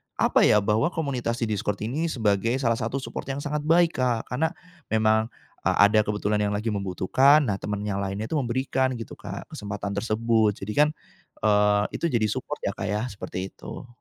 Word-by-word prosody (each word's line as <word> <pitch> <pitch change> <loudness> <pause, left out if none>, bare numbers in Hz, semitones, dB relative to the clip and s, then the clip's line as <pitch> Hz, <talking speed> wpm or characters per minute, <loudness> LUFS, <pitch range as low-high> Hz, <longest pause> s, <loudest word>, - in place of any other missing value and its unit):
apa, - - +4
ya, 105 - +5
bahwa 110 +10 +2
komunitas 125 -7 -2
di - - +2
Discord 105 -1 -1
ini 145 +9 -1
sebagai 115 -3 +1
salah 115 -2 +2
satu 115 +5 -2
support - - -6
yang 135 +1 -3
sangat 150 0 -2
baik, 170 +1 +3
Kak, 120 -3 0
karena 155 +6 +1 0.4
memang 110 0 +3 0.4
a - - +5
ada 110 0 +4
kebetulan 105 0 0
yang 105 0 0
lagi 110 +2 -1
membutuhkan. 105 +10 +3
Nah, 100 -6 -1
temen 105 0 -3
yang 100 -1 -2
lainnya 100 +2 -3
itu 160 - 0
memberikan 130 +1 0
gitu, 115 -2 -7
Kak, - - -7
kesempatan 100 0 -5
tersebut, 110 0 +1
jadi 105 +2 -4
kan, - - +1 0.6
eee, 105 -1 +4
itu - - -2
jadi 115 -7 +1
support 130 +4 -4
ya, 100 - 0
Kak, 100 - -4
ya, 105 +2 -1
seperti 95 -2 -5
itu. - - -9
110 Hz, 190 wpm, -25 LUFS, 105-130 Hz, 0.6 s, ya